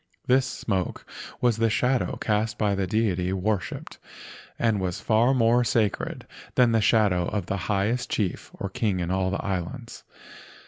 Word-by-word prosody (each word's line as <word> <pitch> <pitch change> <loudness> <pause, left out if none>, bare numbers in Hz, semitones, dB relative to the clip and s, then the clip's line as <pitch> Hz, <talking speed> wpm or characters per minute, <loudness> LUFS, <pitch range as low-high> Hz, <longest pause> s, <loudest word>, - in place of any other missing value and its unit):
This 130 +1 +3
smoke 95 -7 -3 0.4
was 120 -3 +3
the 115 0 +2
shadow 125 +4 +1
cast 105 0 -1
by 105 -2 +1
the 95 -1 -1
deity 95 -4 0
worshipped, 95 0 -3 0.6
and 115 -3 +1
was 90 -1 -2
far 115 +3 +3
more 120 0 +4
sacred 110 -4 -1 0.3
than 125 -2 +5
the 115 -1 +3
shadow 100 -5 +3
of 100 -4 -2
the 100 - -2
highest 105 +5 0
chief 100 -5 -2
or - - -4
king 105 -4 0
in 90 0 -2
all 95 0 +1
the 95 - -3
islands. 100 +6 -4
105 Hz, 155 wpm, -26 LUFS, 95-115 Hz, 0.6 s, than